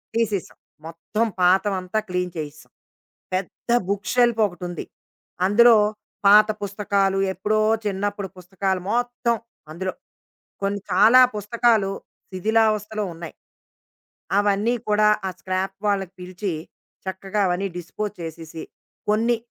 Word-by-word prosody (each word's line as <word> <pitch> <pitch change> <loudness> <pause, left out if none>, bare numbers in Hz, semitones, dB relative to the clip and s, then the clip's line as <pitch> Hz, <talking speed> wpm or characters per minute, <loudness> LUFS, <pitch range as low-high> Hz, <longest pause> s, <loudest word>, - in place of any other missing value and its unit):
తీసేసాం. 210 -5 -1 0.3
మొత్తం 190 +7 -2 0.2
పాతదంతా 190 +2 +2
క్లీన్ 180 -1 -1
చేసేసాం. 155 0 -7 0.6
పెద్ద 190 +5 -4 0.2
బుక్ 200 0 -2
షెల్ఫ్ 240 -2 +3
ఒకటుంది. 175 -2 -6 0.6
అందులో 230 +3 +7 0.5
పాత 210 +1 +8
పుస్తకాలు, 200 -1 0
ఎప్పుడో 210 +4 0 0.2
చిన్నప్పుడు 205 0 -2
పుస్తకాలు 190 +1 -2
మొత్తం 240 -1 0 0.4
అందులో. 185 +3 -3 0.7
కొన్ని 200 0 -1
చాలా 220 +7 +7 0.2
పుస్తకాలు 210 -1 +2 0.4
శిథిలావస్థలో 215 +1 +1
ఉన్నాయి. 165 -1 -9 1.1
అవన్నీ 205 +3 +2 0.2
కూడా 210 0 +4 0.2
ఆ - - -1
స్క్రాప్ 190 +1 -2
వాళ్లకు 195 -2 0
పిలిచి 185 +1 -4 0.5
చక్కగా 190 +2 -3
అవన్నీ 180 +2 0
డిస్పోజ్ 205 +4 -5
చేసేసి, 160 0 -7 0.5
కొన్ని 230 +2 +2
200 Hz, 100 wpm, -23 LUFS, 185-215 Hz, 1.1 s, పాత